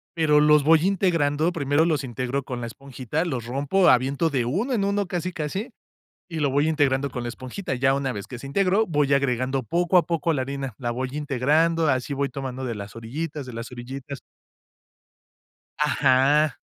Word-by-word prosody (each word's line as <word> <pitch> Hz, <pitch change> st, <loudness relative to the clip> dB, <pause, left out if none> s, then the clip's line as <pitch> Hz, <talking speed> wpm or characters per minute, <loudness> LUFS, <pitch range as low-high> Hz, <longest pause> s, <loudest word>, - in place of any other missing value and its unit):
pero 155 Hz, -3 st, +4 dB
los 150 Hz, -1 st, +5 dB
voy 160 Hz, +1 st, +5 dB
integrando, 165 Hz, -5 st, +1 dB
primero 145 Hz, +1 st, +2 dB
los 155 Hz, -4 st, 0 dB
íntegro 130 Hz, +2 st, -3 dB
con 125 Hz, -2 st, -5 dB
la 120 Hz, -, -4 dB
esponjita, 135 Hz, +4 st, -4 dB
los 130 Hz, -9 st, -3 dB
rompo, 140 Hz, +10 st, +1 dB
aviento 135 Hz, +6 st, +2 dB
de 125 Hz, -4 st, 0 dB
1 205 Hz, -, -1 dB
en 210 Hz, -, +1 dB
1, 200 Hz, 0 st, 0 dB
casi, 180 Hz, 0 st, -3 dB
casi, 170 Hz, -, -4 dB, 0.6 s
y 165 Hz, -3 st, -4 dB
lo 145 Hz, -2 st, +2 dB
voy 145 Hz, +3 st, +2 dB
integrando 140 Hz, -3 st, +1 dB
con 125 Hz, -, -5 dB
la 120 Hz, -, -4 dB
esponjita. 130 Hz, +6 st, -5 dB
Ya 135 Hz, +2 st, +2 dB
una 135 Hz, -2 st, -1 dB
vez 100 Hz, -1 st, -6 dB
que 125 Hz, -, -8 dB
se 135 Hz, -, -8 dB
integró, 195 Hz, +6 st, +2 dB
voy 145 Hz, -4 st, +2 dB
agregando 130 Hz, -1 st, 0 dB
poco 175 Hz, -, +1 dB
a -, -, +4 dB
poco 165 Hz, -1 st, 0 dB
la 135 Hz, -4 st, -1 dB
harina, 135 Hz, -3 st, -5 dB
la 120 Hz, -2 st, -2 dB
voy 130 Hz, +1 st, -3 dB
integrando, 150 Hz, +4 st, +1 dB
así 130 Hz, +1 st, 0 dB
voy 140 Hz, 0 st, -1 dB
tomando 130 Hz, -1 st, -5 dB
de 120 Hz, -3 st, -3 dB
las 100 Hz, +1 st, -8 dB
orillitas, 145 Hz, +5 st, -5 dB
de 125 Hz, -, -8 dB
las 115 Hz, +1 st, -6 dB
orillitas 135 Hz, +2 st, -7 dB, 1.6 s
Ajá. 145 Hz, 0 st, +3 dB
140 Hz, 185 wpm, -24 LUFS, 130-160 Hz, 1.6 s, los